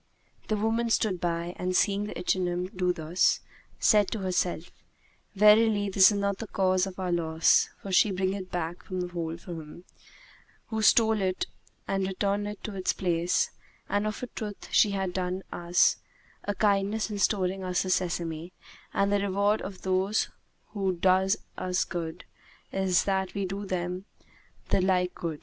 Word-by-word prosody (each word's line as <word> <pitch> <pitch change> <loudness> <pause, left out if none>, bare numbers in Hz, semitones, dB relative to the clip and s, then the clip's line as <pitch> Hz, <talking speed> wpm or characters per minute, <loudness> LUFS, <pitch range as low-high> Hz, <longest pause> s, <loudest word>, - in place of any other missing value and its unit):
The 215 - 0
woman 225 +2 0
stood 200 -6 +1
by 170 0 -2
and, 185 0 -1
seeing 200 +1 +2
the 210 - -6
ichneumon 180 0 -1
do 180 -1 +1
thus, 170 +1 +1 0.4
said 210 -3 +4
to 220 - -3
herself, 180 -2 -1 0.6
"Verily 210 0 +5
this 190 0 +7
is 205 - -1
not 200 -1 -1
the 225 - -5
cause 185 -1 +1
of 185 - -8
our 185 -1 -1
loss, 160 -1 +3
for 195 - -5
she 200 +3 +5
bringeth 190 +1 -1
it - - -28
back 175 0 -3
from 185 -1 -4
the 180 - -3
hole 170 -2 -3
of 170 - -11
him 165 -1 -8 0.9
who 220 -1 -2
stole 220 -1 +4
it 185 -1 0 0.4
and 195 -1 0
returneth 205 +2 -1
it - - -34
to 215 - -5
its 185 -1 0
place; 180 - 0 0.4
and 205 +1 0
of 215 +3 -4
a - - 0
truth 210 -4 -7
she 210 - +5
hath 190 -2 -2
done 185 0 -2
us 175 0 +3 0.5
a 205 - -1
kindness 210 +1 +1
in 205 - -3
restoring 190 -1 +1
us 180 -1 0
the 185 - -2
sesame, 170 -1 -2 0.4
and 200 +1 +2
the 205 - +3
reward 200 +2 +1
of 195 -1 -8
those 190 +3 +1 0.4
who 195 -3 -1
do 185 +2 +3 0.3
us 180 0 0
good 165 -2 -5 0.5
is 190 -2 +2
that 190 -1 -1
we 200 -1 -1
do 195 +2 -5
them 180 +1 -3 0.6
the - - +3
like 180 -1 +1
good. 160 -3 -5
190 Hz, 170 wpm, -28 LUFS, 180-200 Hz, 0.9 s, this